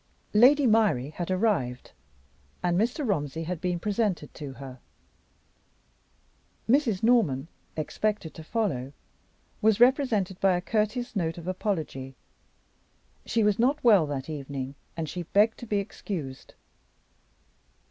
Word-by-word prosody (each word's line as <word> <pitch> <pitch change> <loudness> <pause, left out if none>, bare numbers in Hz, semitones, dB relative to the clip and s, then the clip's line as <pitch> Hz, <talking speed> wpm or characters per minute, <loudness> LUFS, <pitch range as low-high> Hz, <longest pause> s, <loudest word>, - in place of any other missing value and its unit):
Lady 265 +7 +6
Myrie 210 - +3
had 175 +2 -5
arrived, 185 - 0 0.7
and 175 -1 +2
Mr. 240 - 0
Romsey 160 -5 -1
had 175 0 -4
been 180 -1 0
presented 200 -5 -1
to 145 -3 -7
her. 130 -1 -10 1.9
Mrs. 230 -6 +2
Norman, 200 - +3 0.3
expected 200 +3 -2
to 160 - -10
follow, 155 - -2 0.7
was 220 -1 +3
represented 240 -8 +3
by 190 -2 +3
a - - -1
courteous 215 +5 -1
note 165 -4 -1
of 170 0 -8
apology. 160 -9 -3 1.1
She 225 -1 +2
was 210 0 +2
not 275 +6 +2
well 205 -10 +6
that 140 -2 -4
evening, 140 -3 -5 0.2
and 160 -1 -2
she 175 +4 -4
begged 205 +6 +2
to 240 - -8
be 210 - 0
excused. 170 -8 -6
185 Hz, 125 wpm, -27 LUFS, 150-220 Hz, 1.9 s, Lady